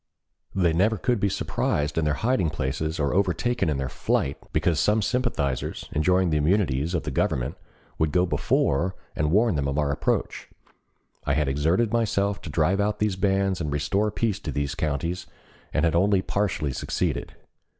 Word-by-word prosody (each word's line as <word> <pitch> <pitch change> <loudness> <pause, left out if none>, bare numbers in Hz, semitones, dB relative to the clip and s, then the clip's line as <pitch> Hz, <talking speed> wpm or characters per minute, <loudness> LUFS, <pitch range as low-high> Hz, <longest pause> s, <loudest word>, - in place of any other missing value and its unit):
They 90 -4 +3
never 105 +6 +2
could 120 +2 0
be 100 - +2
surprised 75 -5 -1
in 80 - +1
their 75 -1 +1
hiding 110 - +1
places 80 +2 -3
or 70 -2 +1
overtaken 100 +3 +1
in 75 - 0
their 65 -1 -2
flight, 70 +2 -1 0.2
because 80 -3 +1
some 105 +1 +2
sympathizers, 105 - -1
enjoying 90 +3 +2
the 75 - +2
immunities 80 -1 +1
of 80 - -1
the - - -4
Government, - - 0 0.4
would 80 -1 +2
go 90 0 +3
before 85 0 +1 0.2
and 75 0 0
warn 110 +5 +3
them 70 -3 -1
of 70 +1 -2
our 75 -2 +1
approach. 70 - -1 0.7
I 70 - 0
had 75 -2 +1
exerted 80 +11 +1
myself 100 -3 +1
to - - -8
drive 85 +6 +2
out 105 +1 0
these 105 -3 0
bands 95 -1 +1
and 75 -3 -2
restore 95 +9 +1
peace 105 -2 -1
to 75 - -5
these 70 +1 -2
counties 80 +4 -2 0.4
and 80 - +1
had 85 - +2
only 95 +2 +3
partially 90 -9 -1
succeeded. - - -2
85 Hz, 175 wpm, -25 LUFS, 75-100 Hz, 0.7 s, They